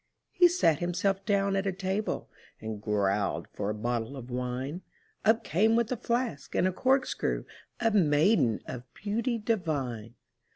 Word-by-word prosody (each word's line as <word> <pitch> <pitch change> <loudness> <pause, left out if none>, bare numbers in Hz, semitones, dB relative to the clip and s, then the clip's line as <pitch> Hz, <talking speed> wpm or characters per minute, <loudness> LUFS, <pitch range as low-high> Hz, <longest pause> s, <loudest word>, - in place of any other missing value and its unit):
He 360 -2 +6
sat 340 - +2
himself 180 +3 0
down 200 -1 +2
at 195 0 0
a - - +2
table, 190 +3 -2 0.3
And 110 -1 -6
growled 100 -1 0
for 100 0 -2
a 105 - -2
bottle 120 +3 -2
of 125 -1 -9
wine; 125 +6 -3 0.4
Up 220 +1 +4
came 215 +8 +3
with 235 0 +1
a - - +1
flask 235 - -2
and 185 - +3
a - - +1
corkscrew 265 +4 +1 0.3
A 225 -1 +2
maiden 150 - +3
of 125 0 -8
beauty 230 +4 -1
divine. 145 - -2
180 Hz, 155 wpm, -29 LUFS, -, 0.4 s, He